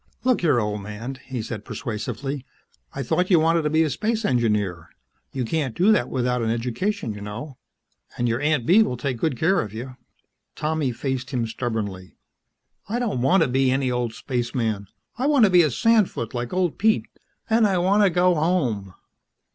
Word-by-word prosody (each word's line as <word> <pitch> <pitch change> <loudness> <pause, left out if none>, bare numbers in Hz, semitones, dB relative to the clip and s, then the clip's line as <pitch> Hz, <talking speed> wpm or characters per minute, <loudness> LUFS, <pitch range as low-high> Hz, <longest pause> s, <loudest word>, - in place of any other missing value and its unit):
"Look 255 -1 +2
here, 150 -8 +3
old 105 -1 -2
man," 110 +6 -7
he 130 -4 -4
said 110 -2 -6
persuasively. 125 +4 -4 0.5
"I 135 - -4
thought 180 +9 0
you 175 -4 +6
wanted 165 +1 +3
to 150 - 0
be 160 +1 +3
a 155 - 0
space 220 - -1
engineer. 105 - 0 0.4
You 130 -2 -2
can't 135 -2 -2
do 190 +5 +5
that 125 - +2
without 125 -1 0
an 115 - 0
education 120 - -2
you 105 - -9
know. 120 +7 -7 0.6
And 120 - 0
your 120 +3 0
Aunt 150 -4 +1
Bee 190 - +6
will 125 - 0
take 125 0 -2
good 145 -3 0
care 180 +7 +2
of 105 -1 -7
you." 125 +3 -7 0.6
Tommy 150 -3 -1
faced 130 +1 -3
him 125 -4 -1
stubbornly. 110 -5 -4 0.7
"I 230 - -1
don't 230 - -1
want 180 +10 +4
to - - +1
be 130 +1 +2
any 130 0 +1
old 120 -2 -2
spaceman. 115 -5 -2 0.3
I 265 - +1
want 285 -6 +5
to 195 - +2
be 180 -1 +7
a 155 - +3
sandfoot 210 - +1
like 120 -1 -3
old 180 -3 0
Pete. 220 +1 +3 0.4
And 225 -1 +4
I 190 -2 +1
want 190 +4 +3
to 200 - +5
go 180 +1 +3
home." 135 - 0
130 Hz, 190 wpm, -23 LUFS, 115-175 Hz, 0.7 s, be